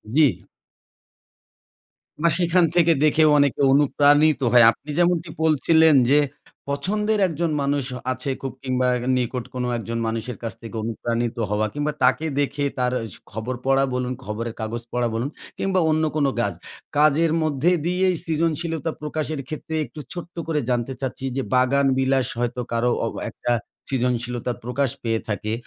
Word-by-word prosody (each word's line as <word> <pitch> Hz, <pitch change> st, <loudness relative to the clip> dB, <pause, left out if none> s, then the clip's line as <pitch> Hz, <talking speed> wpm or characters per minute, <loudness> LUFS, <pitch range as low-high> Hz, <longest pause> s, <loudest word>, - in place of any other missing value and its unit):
জি। 130 Hz, -, +4 dB, 1.8 s
বা 170 Hz, -, +5 dB
সেখান 175 Hz, 0 st, +3 dB
থেকে 170 Hz, -1 st, +5 dB
দেখেও 155 Hz, 0 st, +4 dB
অনেকটা 140 Hz, 0 st, +2 dB
অনুপ্রাণিত 145 Hz, 0 st, +4 dB
হয়। 120 Hz, -2 st, +7 dB
আপনি 150 Hz, -, -15 dB
যেমনটি 175 Hz, -1 st, +2 dB
বলছিলেন 160 Hz, 0 st, +4 dB, 0.2 s
যে, 145 Hz, -, +6 dB, 0.5 s
পছন্দের 210 Hz, +8 st, 0 dB
একজন 165 Hz, 0 st, -2 dB
মানুষ 140 Hz, -1 st, 0 dB, 0.3 s
আছে, 130 Hz, +2 st, -3 dB
খুব 135 Hz, -1 st, -4 dB
কিংবা 130 Hz, -1 st, 0 dB, 0.3 s
নিকট 125 Hz, 0 st, -2 dB
কোনো 125 Hz, -1 st, -2 dB
একজন 115 Hz, +1 st, -4 dB
মানুষের 115 Hz, +2 st, -4 dB
কাছ 115 Hz, -4 st, -3 dB
থেকে 115 Hz, 0 st, -9 dB
অনুপ্রাণিত 115 Hz, +1 st, -2 dB
হওয়া। 105 Hz, +1 st, +1 dB
কিংবা 145 Hz, +1 st, -1 dB
তাকে 130 Hz, +5 st, +3 dB
দেখে 145 Hz, 0 st, -1 dB, 0.2 s
তার 125 Hz, 0 st, +1 dB, 0.2 s
স -, -, -10 dB, 0.2 s
খবর 110 Hz, +4 st, -4 dB
পড়া 135 Hz, 0 st, +3 dB
বলুন, 125 Hz, 0 st, -1 dB
খবরের 115 Hz, +2 st, -4 dB
কাগজ 115 Hz, +2 st, -3 dB
পড়া 120 Hz, -1 st, +1 dB
বলুন 125 Hz, +5 st, -1 dB, 0.3 s
কিংবা 190 Hz, -1 st, +1 dB
অন্য 155 Hz, 0 st, +1 dB
কোনো 140 Hz, -3 st, +2 dB
কাজ। 100 Hz, -5 st, -1 dB, 0.4 s
কাজের 155 Hz, +2 st, +4 dB
মধ্যে 155 Hz, +3 st, +1 dB
দিয়েই 180 Hz, +1 st, +2 dB
সৃজনশীলতা 165 Hz, 0 st, -1 dB
প্রকাশের 155 Hz, -1 st, -3 dB
ক্ষেত্রে 160 Hz, +1 st, -5 dB
একটু 155 Hz, -, -12 dB
ছোট্ট 175 Hz, 0 st, -8 dB
করে 155 Hz, -2 st, 0 dB
জানতে 125 Hz, +2 st, 0 dB
চাচ্ছি 130 Hz, 0 st, -4 dB
যে, -, -, +1 dB
বাগান 135 Hz, +2 st, +3 dB
বিলাস 130 Hz, -2 st, +2 dB
হয়তো 120 Hz, +1 st, -1 dB
কারো 115 Hz, +1 st, +1 dB, 0.2 s
অ -, -, 0 dB, 0.2 s
একটা 120 Hz, -, -3 dB, 0.4 s
সৃজনশীলতার 125 Hz, -1 st, -1 dB
প্রকাশ 130 Hz, +1 st, 0 dB
পেয়ে 115 Hz, -1 st, 0 dB
থাকে। 110 Hz, +1 st, -2 dB
135 Hz, 150 wpm, -23 LUFS, 120-155 Hz, 1.8 s, হয়